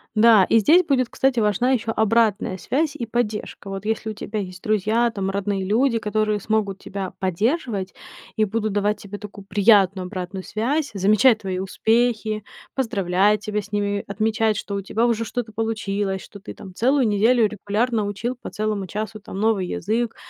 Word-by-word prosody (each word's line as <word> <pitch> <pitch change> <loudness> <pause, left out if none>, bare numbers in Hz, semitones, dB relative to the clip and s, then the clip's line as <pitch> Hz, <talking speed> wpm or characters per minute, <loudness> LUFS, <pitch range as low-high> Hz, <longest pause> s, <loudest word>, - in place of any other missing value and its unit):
Да, 215 -3 +6
и 225 - +5
здесь 335 - +5
будет, 260 -6 +1
кстати, 265 -3 +1
важна 215 +5 +2
ещё 230 -3 0
обратная 220 -3 +2
связь 300 - -1
и 235 - -4
поддержка. 215 -3 -3
Вот 195 +1 -6
если 220 0 -1
у - - -4
тебя 210 +1 -5
есть 185 -2 -7
друзья, 215 +3 +1
там, 195 -3 -3
родные 195 0 -1
люди, 230 +4 +2
которые 215 -1 0
смогут 200 -2 -1
тебя 190 -2 -6
поддерживать 200 - -1 0.4
и 215 -1 +2
будут 215 0 -2
давать 205 +1 +1
тебе 205 0 -8
такую 205 -2 -10
приятную 195 -2 +4
обратную 185 0 -5
связь, 275 +8 -1
замечать 215 +4 +4
твои 185 -2 -3
успехи, 220 +1 0 0.3
поздравлять 210 -4 +1
тебя 210 -1 -2
с 205 - -15
ними, 205 -1 -1
отмечать, 220 +1 0
что 200 -2 -4
у 200 - -2
тебя 225 +4 0
уже 230 -1 +1
что-то 235 -1 -4
получилось, 205 -3 -2
что 205 - -12
ты - - -9
там 190 -2 -11
целую 255 +3 +2
неделю 220 +2 +3
регулярно 215 +2 -1
учил 225 +5 -3
по - - -6
целому 210 -3 -2
часу, 215 +2 -5
там, 195 -1 -8
новый 210 -4 +1
язык 225 +5 -2
215 Hz, 175 wpm, -22 LUFS, 200-230 Hz, 0.4 s, Да